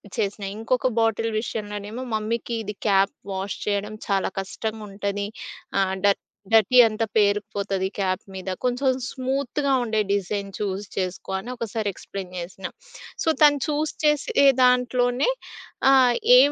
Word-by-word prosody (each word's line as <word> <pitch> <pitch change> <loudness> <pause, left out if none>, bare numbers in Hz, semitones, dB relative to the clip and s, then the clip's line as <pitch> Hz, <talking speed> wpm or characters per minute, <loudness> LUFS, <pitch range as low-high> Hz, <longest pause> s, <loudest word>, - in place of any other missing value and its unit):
చేసినా. 200 0 -2
ఇంకొక 245 +3 +1
బాటిల్ 225 0 +1
విషయంలోనేమో 210 +1 -5
మమ్మీకి 220 +2 -2
ఇది 210 0 -5
క్యాప్ 195 -1 +4 0.2
వాష్ 190 +1 -3
చేయడం 205 +1 -1
చాలా 195 -1 +1
కష్టంగుంటది. 200 0 -4 0.5
ఆహ్, 190 -1 +1
డ - - +7 0.5
డర్టీ 225 +3 +5
అంత 215 +1 -2
పేరుకుపోతది 200 -2 +1
క్యాప్ 185 -1 0
మీద. 190 0 -5
కొంచెం 250 +2 +2 0.2
స్మూత్‌గా 270 +1 -1
ఉండే 220 -2 0
డిజైన్ 200 0 -1
చూజ్ 200 0 -3
చేసుకో 185 0 -3
అని 235 +6 -7
ఒకసారి 220 -3 -2
ఎక్స్‌ప్లెయిన్ 185 0 -8
జేసినా. 185 +2 -6 0.5
సో, - - -5
తను 290 -1 +7
చూజ్ 300 0 -1
చేసే 300 -2 +3 0.2
దాంట్లోనే 250 - +3 0.6
ఆహ్, 255 -3 +6 0.2
ఏం 280 +3 +7
215 Hz, 125 wpm, -24 LUFS, 200-250 Hz, 0.6 s, డ